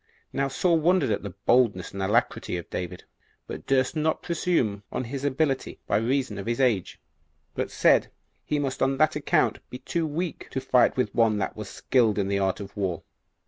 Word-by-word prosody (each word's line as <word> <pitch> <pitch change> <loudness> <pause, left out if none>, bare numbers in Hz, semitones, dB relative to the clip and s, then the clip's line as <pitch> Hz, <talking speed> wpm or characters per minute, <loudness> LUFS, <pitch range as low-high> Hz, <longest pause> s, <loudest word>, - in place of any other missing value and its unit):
3. - - -8
Now 140 - +2
Saul 165 +4 +2
wondered 160 -6 +3
at 105 - 0
the 100 -3 -7
boldness 115 -8 +3
and 100 - -4
alacrity 100 -2 0
of 85 - -7
David, 90 0 -5 0.4
but - - -8
durst 135 +2 +2
not 155 0 0
presume 165 - 0
on - - -2
his 135 +3 -5
ability, 140 -1 -1
by - - +1
reason 120 -2 0
of 100 - -6
his 120 +1 -1
age; 120 -8 +1 0.5
but - - -2
said - - +3 0.3
he 150 - -1
must 135 -2 -2
on 135 0 +2
that 155 +2 +3
account 150 - +1
be 125 - -6
too 160 +5 -2
weak 165 +3 -4
to 130 - -2
fight 130 -1 +3
with 125 - 0
one 115 -2 +3
that 100 - -2
was 105 -2 -7
skilled 115 -5 +2
in 100 -1 0
the 100 0 +1
art 95 +1 0
of 100 -1 -9
war. 95 -4 -2
125 Hz, 200 wpm, -26 LUFS, 100-145 Hz, 0.5 s, wondered